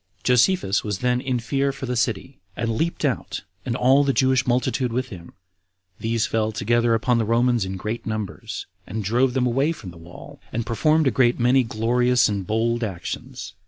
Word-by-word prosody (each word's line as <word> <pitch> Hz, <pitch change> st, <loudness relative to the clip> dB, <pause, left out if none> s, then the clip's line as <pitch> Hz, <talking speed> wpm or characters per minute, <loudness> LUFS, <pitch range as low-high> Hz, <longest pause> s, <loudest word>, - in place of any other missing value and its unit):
Josephus 125 Hz, -, +3 dB
was 105 Hz, -3 st, -2 dB
then 125 Hz, +3 st, 0 dB
in 130 Hz, -2 st, -1 dB
fear 135 Hz, +4 st, 0 dB
for 135 Hz, 0 st, -7 dB
the 125 Hz, 0 st, -2 dB
city, 120 Hz, +1 st, -2 dB, 0.2 s
and 115 Hz, -1 st, -1 dB
leaped 165 Hz, +9 st, -1 dB
out, -, -, -2 dB, 0.2 s
and 120 Hz, -, -1 dB
all 130 Hz, +3 st, +4 dB
the 140 Hz, -, +2 dB
Jewish 130 Hz, -1 st, +2 dB
multitude 125 Hz, 0 st, 0 dB
with 130 Hz, +2 st, -2 dB
him; 85 Hz, -5 st, -11 dB, 0.7 s
these 115 Hz, 0 st, 0 dB
fell 110 Hz, -1 st, 0 dB
together 115 Hz, +2 st, +1 dB
upon 120 Hz, +1 st, +1 dB
the -, -, +1 dB
Romans 120 Hz, 0 st, +2 dB
in 95 Hz, 0 st, -5 dB
great 105 Hz, +5 st, -4 dB
numbers, 110 Hz, -3 st, -5 dB, 0.2 s
and 110 Hz, +1 st, -4 dB
drove 125 Hz, +5 st, +1 dB
them 130 Hz, -1 st, +2 dB
away 135 Hz, +6 st, +1 dB
from 105 Hz, -, -8 dB
the 85 Hz, -, -14 dB
wall, 85 Hz, +2 st, -13 dB
and 115 Hz, 0 st, -2 dB
performed 155 Hz, +7 st, +2 dB
a 130 Hz, -, +3 dB
great 125 Hz, -2 st, +2 dB
many 125 Hz, +2 st, +4 dB
glorious 120 Hz, +2 st, +2 dB
and 100 Hz, -3 st, -3 dB
bold 115 Hz, +2 st, 0 dB
actions. 90 Hz, -2 st, -6 dB
120 Hz, 190 wpm, -23 LUFS, 110-130 Hz, 0.7 s, all